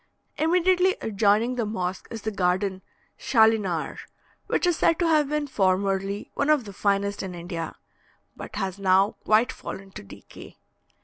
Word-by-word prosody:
Immediately 365 +3 +3
adjoining 220 +3 +1
the 235 - 0
mosque 185 -3 -4
is 225 -2 -7
the 220 - -2
garden 190 0 0 0.4
"Schalinar," 220 - +2 0.5
which - - 0
is 350 -1 +2
said 330 - +3
to 345 - +1
have 305 -3 +3
been 300 0 -1
formerly 195 -3 0
one 285 - -1
of 300 -6 +3
the 200 - -9
finest 200 +1 0
in 185 -2 -6
India, 170 -1 -5 0.6
but - - -9
has 190 0 -3
now 195 +1 +3
quite 220 +3 +3
fallen 195 0 -8
to - - -9
decay. 100 - -13
205 Hz, 150 wpm, -25 LUFS, 190-255 Hz, 0.6 s, Immediately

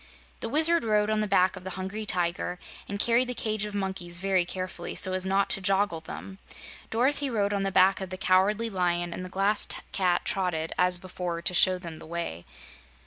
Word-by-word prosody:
The 230 - -4
Wizard 320 +4 +3
rode 210 -1 +2
on 215 - +1
the 210 - -1
back 185 -1 +3
of - - -10
the 190 - -5
Hungry 200 +3 -5
Tiger 175 0 -1 0.3
and 200 0 -4
carried 240 +3 +3
the 250 - -3
cage 215 -2 -1
of 210 -1 -6
monkeys 190 -3 -3
very 190 -1 +1
carefully, 185 -1 -5
so 185 - +4
as 185 0 -2
not 195 +1 +2
to 195 - 0
joggle 195 -3 +1
them. 190 +4 -9 0.5
Dorothy 270 +5 +1
rode 205 -4 0
on 200 - 0
the 195 0 -1
back 190 +1 +4
of 190 - -5
the 185 - -6
Cowardly 195 +5 +2
Lion, 175 -4 -1
and 185 - -6
the 185 - -7
Glass 195 +3 +1 0.2
Cat 180 -2 +1
trotted, 175 -4 -1
as 180 0 +5
before, 180 -2 -5
to 180 - +1
show 185 +1 +5
them 170 -3 -8
the - - -12
way. 160 - -5
190 Hz, 205 wpm, -27 LUFS, 180-210 Hz, 0.5 s, as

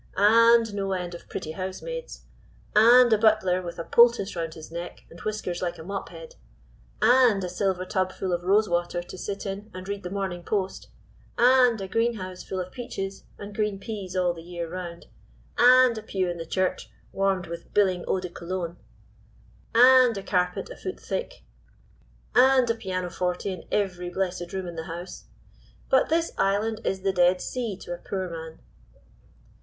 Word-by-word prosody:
"And 230 +2 +5
no 195 -1 -2
end 180 -1 -4
of 170 - -11
pretty 155 - -5
housemaids. 195 - -6 0.5
"And 240 +2 +7
a 215 - +3
butler 210 -5 +3
with 175 -1 -7
a 165 - -4
poultice 235 -2 +4
round 165 -2 -4
his 160 0 -11
neck 170 +1 -7
and 170 - -12
whiskers 210 -5 -3
like 175 -2 -2
a - - -9
mop 195 +2 -5
head. 165 -1 -11 0.7
"And 240 -5 +5
a - - -2
silver 185 0 -1
tub 185 0 -1
full 185 -1 -3
of 175 - -1
rose 205 +4 +3
water 175 0 -1
to 175 - -10
sit 200 +3 -5
in 200 +2 -5
and 185 +1 -8
read 200 0 -4
the 180 - -6
Morning 190 -2 -3
Post. 190 +1 -3 0.5
"And 250 -2 +5
a 195 - -5
green 230 +4 +1
house 185 -2 -7
full 190 - -5
of 185 0 -5
peaches 195 -6 -6
and 205 0 -9
green 210 -1 -1
peas 195 -3 -6
all 180 -1 +2
the 165 - -10
year 170 0 -6
round. 170 0 -7 0.5
"And 255 -1 +7
a - - -9
pew 190 -4 -2
in 175 -1 -4
the 165 - -6
church 185 +1 -1 0.2
warmed 195 -2 0
with 170 0 -8
biling 185 -4 +2
eau 190 - +1
de 180 -1 -6
Cologne. 175 0 -5 1.0
"And 250 -1 +7
a 195 - -5
carpet 180 - -1
a - - -7
foot 375 - -6
thick. - - -5 0.9
"And 260 0 +5
a - - +1
piano 185 -5 -4
forte 180 0 -2
in 180 - -10
every 180 -3 -1
blessed 180 -1 -3
room 190 -1 -4
in 175 -1 -7
the 160 - -4
house. 170 +3 -8 0.7
But 265 - +4
this 330 +1 +1
island 215 +3 +1
is 190 0 -1
the 195 -1 +1
Dead 180 0 +4
Sea 230 -5 -4
to 175 - -5
a - - -5
poor 190 0 -4
man." 160 -1 -8
190 Hz, 185 wpm, -26 LUFS, 175-215 Hz, 1.0 s, And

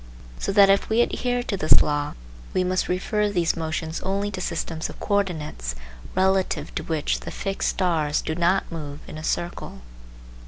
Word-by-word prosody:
So - - -1
that 200 -1 +7
if 200 - +2
we 225 +2 +4
adhere 245 0 0
to 210 - -2
this 155 -5 +6
law 145 0 -1 0.4
we 185 - +3
must 185 0 0
refer 210 +3 +1
these 175 -4 +1
motions 160 0 -3
only 200 +2 -1
to 190 -2 -4
systems 165 -2 -2
of - - -10
coordinates 160 - -1 0.4
relative 190 0 +1
to - - -2
which 160 -3 0
the - - -7
fixed 195 -1 -1
stars 160 -6 +1
do 155 - -1
not 175 +3 +2
move 150 -3 -6
in 155 - -7
a - - -8
circle. 170 - -3
180 Hz, 170 wpm, -25 LUFS, 160-195 Hz, 0.4 s, that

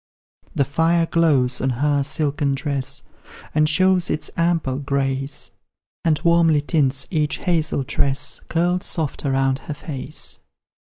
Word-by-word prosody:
The 140 - +2
fire 165 +4 +2
glows 140 -7 +2
on 135 - +1
her 140 +3 +1
silken 145 -1 0
dress, 135 -1 -3 0.5
And 155 0 +3
shows 185 +2 +3
its 155 - -2
ample 165 -6 0
grace, 135 -1 -2 0.5
And 160 -3 +2
warmly 170 -3 +4
tints 140 -3 +1
each 155 -3 0
hazel 160 -6 0
tress, 135 +1 0
Curled 175 +2 0
soft 155 -5 -2
around 135 0 +1
her 150 - -6
face. 145 -1 -5
150 Hz, 125 wpm, -21 LUFS, 135-165 Hz, 0.5 s, warmly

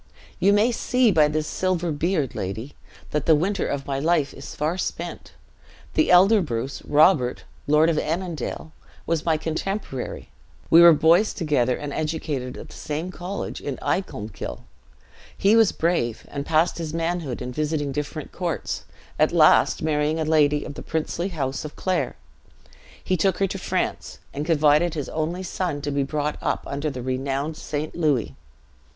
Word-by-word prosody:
You 200 - +4
may 210 +4 +4
see 245 0 +2
by 155 -4 +5
this 155 +1 -1
silver 175 -1 -1
beard, 155 -2 0
lady, 110 +9 -5 0.4
that 150 -2 -1
the 160 - +7
winter 190 +6 0
of 140 -1 -3
my 135 -1 -2
life 155 -1 +1
is - - -9
far 155 +4 -1
spent. 185 - -5 0.6
The 315 - +2
elder 195 +4 +6
Bruce, 135 -3 -3
Robert, 145 -4 +3 0.2
Lord 150 +2 +5
of 165 -2 +2
Annandale, 165 -1 -3 0.3
was 165 -1 -1
my 160 -1 +3
contemporary; 160 -3 -4 0.4
we 165 - +9
were 170 0 +10
boys 165 +7 +4
together, 145 -7 +1
and 145 -1 -5
educated 150 -5 -3
at - - -10
the - - -12
same 155 +5 -4
college 185 +2 -5
in 140 -2 -4
Icolmkill. 110 - -3 0.8
He 200 +3 +4
was 225 -3 +5
brave, 160 -9 -1
and 140 0 -5
passed 165 +2 +2
his 160 -1 -4
manhood 165 -6 -2
in 125 0 -5
visiting 150 +1 -1
different 150 +1 -5
courts; 175 -3 -3 0.3
at - - +4
last, - - +4
marrying 155 0 +1
a 160 - 0
lady 150 -2 +3
of 150 - -6
the - - -8
princely 160 +2 -2
house 140 -7 -3
of 150 - -8
Clare, 185 -1 -1 0.9
he 185 - +1
took 190 +3 +1
her 195 - +2
to 195 0 -4
France, - - -2 0.2
and 145 +3 -4
confided 155 +1 +3
his 145 -3 -4
only 165 +4 -2
son 175 -5 -2
to 145 - -2
be 140 0 0
brought 150 +2 -2
up - - -1
under 145 +2 -2
the 130 -3 -6
renowned 135 +4 -2
St. 150 0 -4
Louis. 140 - +1
155 Hz, 165 wpm, -24 LUFS, 145-175 Hz, 0.9 s, were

